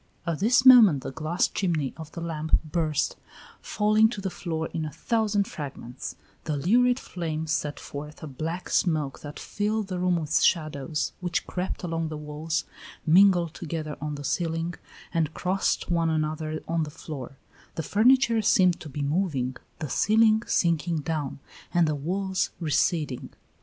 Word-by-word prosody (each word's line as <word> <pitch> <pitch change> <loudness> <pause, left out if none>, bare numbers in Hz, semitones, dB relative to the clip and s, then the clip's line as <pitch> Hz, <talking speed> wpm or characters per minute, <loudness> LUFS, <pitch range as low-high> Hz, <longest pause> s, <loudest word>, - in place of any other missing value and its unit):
At 165 -3 -2
this 240 +6 +4
moment 220 - +8
the - - -4
glass 160 +5 0
chimney 160 -8 -1
of 160 -1 -9
the 170 - -6
lamp 160 -2 +1
burst, 155 -2 0 0.4
falling 215 +1 +3
to 220 - -5
the 190 -1 -3
floor 160 -3 -3
in 160 - -2
a 155 - -4
thousand 205 - 0
fragments; 135 -4 -7 0.3
the 150 -2 -1
lurid 245 - +3
flame 160 -3 -4
sent 150 -2 -2
forth 150 +2 -8
a - - -5
black 160 +6 -5
smoke 155 -6 +1
that 145 0 -8
filled 210 0 -2
the 180 -1 -3
room 180 0 +2
with 160 +2 +1
shadows 155 -2 0
which 175 -1 -1
crept 185 +1 -4
along 165 -2 -2
the 155 -1 -5
walls, 150 +2 -3 0.4
mingled 175 -1 +5
together 155 -2 -5
on 150 0 -3
the 145 - -7
ceiling, 165 +3 -1 0.4
and 160 -2 0
crossed 185 0 0
one 165 -1 +2
another 155 0 -2
on 165 0 0
the 155 - -2
floor; 140 -3 -8 0.4
the 160 - -3
furniture 235 - +4
seemed 185 -4 +4
to 155 - -9
be 145 +1 -4
moving, 140 -5 0 0.2
the 155 - -4
ceiling 220 - +4
sinking 170 -1 +1
down, 150 -2 -3 0.4
and 170 -2 +4
the 155 - +1
walls 185 +6 -1
receding. 155 -4 0
165 Hz, 160 wpm, -26 LUFS, 150-185 Hz, 0.4 s, moment